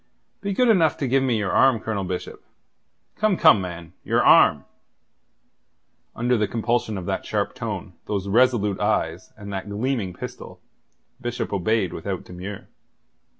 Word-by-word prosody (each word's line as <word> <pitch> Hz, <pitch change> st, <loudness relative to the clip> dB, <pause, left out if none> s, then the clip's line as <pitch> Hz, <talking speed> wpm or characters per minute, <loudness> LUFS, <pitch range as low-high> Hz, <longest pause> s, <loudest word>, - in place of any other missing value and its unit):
"Be 200 Hz, -, -2 dB
good 250 Hz, +5 st, +3 dB
enough 175 Hz, -9 st, +4 dB
to 140 Hz, -, -2 dB
give 135 Hz, +2 st, +3 dB
me 125 Hz, -4 st, +1 dB
your 100 Hz, -3 st, -1 dB
arm, 130 Hz, -4 st, +4 dB
Colonel 110 Hz, -3 st, -3 dB
Bishop. 90 Hz, -1 st, -5 dB, 0.7 s
Come, 215 Hz, -4 st, +2 dB
come, 155 Hz, -11 st, +6 dB
man, 85 Hz, -2 st, -7 dB
your -, -, +1 dB
arm." -, -, +6 dB, 1.5 s
Under 120 Hz, +2 st, +1 dB
the 105 Hz, -, +1 dB
compulsion 115 Hz, 0 st, -1 dB
of 90 Hz, -, -6 dB
that -, -, -2 dB
sharp -, -, -2 dB
tone, -, -, -5 dB
those 100 Hz, -2 st, -2 dB
resolute 110 Hz, -2 st, +2 dB
eyes, 80 Hz, +3 st, -1 dB
and 100 Hz, -1 st, -8 dB
that 95 Hz, +1 st, -5 dB
gleaming 105 Hz, -2 st, -2 dB
pistol, -, -, -9 dB, 0.6 s
Bishop 120 Hz, -3 st, -3 dB
obeyed 100 Hz, -1 st, 0 dB
without -, -, -4 dB
demur. 95 Hz, +3 st, -8 dB
110 Hz, 150 wpm, -23 LUFS, 95-125 Hz, 1.5 s, come